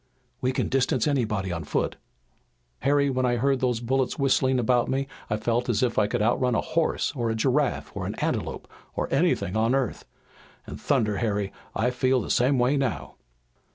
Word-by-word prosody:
"We 130 - +1
can 130 - -1
distance 130 -2 +1
anybody 110 -10 0
on 85 -2 -3
foot. 75 - -1 0.8
Harry, 140 0 +2
when 130 0 0
I 125 -1 +2
heard 135 +2 +1
those 125 -3 0
bullets 125 +1 0
whistling 130 -1 +2
about 120 0 +2
me 135 +1 -1 0.2
I 105 - 0
felt 115 +3 -1
as 115 0 +1
if 120 -3 +1
I 105 - +3
could 105 - -1
outrun 125 +2 +2
a - - +2
horse, 165 -1 0
or 120 -3 -1
a 110 - 0
giraffe, 135 +5 0
or - - -3
an - - -4
antelope, - - -3 0.3
or - - -1
anything 90 - +1
on 115 +4 +2
earth! 135 -5 -2 0.6
And - - -9
thunder, 105 -2 +1
Harry, 100 -3 -1 0.2
I 120 +4 +1
feel 130 +1 +2
the 110 - -3
same 130 +3 +3
way 125 +4 +2
now!" 135 -4 -2
125 Hz, 190 wpm, -26 LUFS, 110-135 Hz, 0.8 s, I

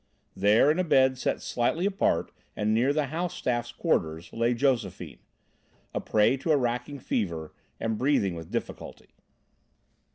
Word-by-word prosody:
There, 105 +9 +4
in 160 - -1
a - - +3
bed 130 -5 +3
set - - -1
slightly 125 +9 0
apart 195 - 0 0.2
and 105 +1 0
near 120 +5 +3
the 150 0 +1
house 175 +1 -2
staff's 120 -1 -2
quarters, 80 - -1
lay 115 +1 +1
Josephine, 120 -3 -1 0.7
a - - -2
prey 110 +5 +2
to 160 +5 -1
a 150 - +5
racking 125 +2 -2
fever 85 - -3 0.3
and 110 -1 -2
breathing 125 -9 +2
with 80 -1 -8
difficulty. - - -6
120 Hz, 150 wpm, -27 LUFS, 105-145 Hz, 0.7 s, a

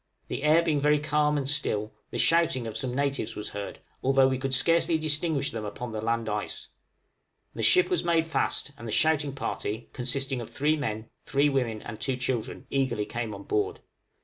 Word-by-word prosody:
The - - -3
air 155 +3 +5
being 150 -4 +1
very 150 +1 +4
calm, 150 0 +1
and 135 -2 -2
still, 110 -7 0 0.2
the - - -4
shouting 165 -7 +3
of 110 - -5
some 125 -1 -1
natives 140 -4 -1
was 105 - -4
heard, 100 0 -5 0.2
although 135 0 +4
we 130 -1 0
could 135 0 -2
scarcely 165 +4 +3
distinguish 155 -2 +1
them 110 -1 -4
upon 115 +3 -5
the 110 0 -3
land 115 0 0
ice. 105 0 -4 0.8
The - - -5
ship 365 -1 +5
was 365 - 0
made 165 -1 +2
fast, 165 -3 -1
and 115 - -7
the - - -4
shouting 150 +1 +2
party, 110 -4 -4
consisting 135 0 -2
of 115 - -7
three 150 +3 +1
men, 110 -7 -4
three 140 +1 +2
women, 120 -6 -1
and 105 - -8
two 135 - 0
children, 125 -2 -2
eagerly 130 -6 0
came 120 -1 -4
on 100 - -9
board. 105 +1 -1
135 Hz, 195 wpm, -28 LUFS, 115-150 Hz, 0.8 s, air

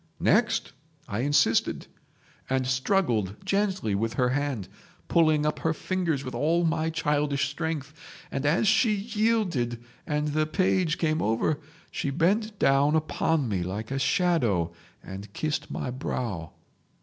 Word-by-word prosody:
"'Next?' - - +2 0.4
I 100 - -3
insisted, 145 -4 +2 0.6
and 130 -1 +1
struggled 130 - +1
gently 190 - 0
with 110 +3 -1
her 125 -1 +2
hand, 135 -6 -1 0.4
pulling 155 -3 +3
up 150 - 0
her 160 0 0
fingers 170 -5 -1
with 130 - -5
all 165 +3 +1
my 160 0 +1
childish 145 -3 0
strength, 155 -2 -3 0.4
and 135 - -2
as 165 +9 +2
she 215 +1 +4
yielded 205 - 0 0.3
and 150 0 0
the 155 +1 +1
page 180 -1 +1
came 155 -1 0
over 115 +7 +1 0.3
she - - -2
bent 200 +9 +1
down 140 +1 +3
upon 155 -2 +1
me 100 -5 -1
like 100 +7 -4
a 135 - -1
shadow 120 - +1 0.3
and 100 +2 -8
kissed 155 -1 -2
my 125 - -3
brow. 115 - -4
150 Hz, 135 wpm, -27 LUFS, 125-165 Hz, 0.6 s, she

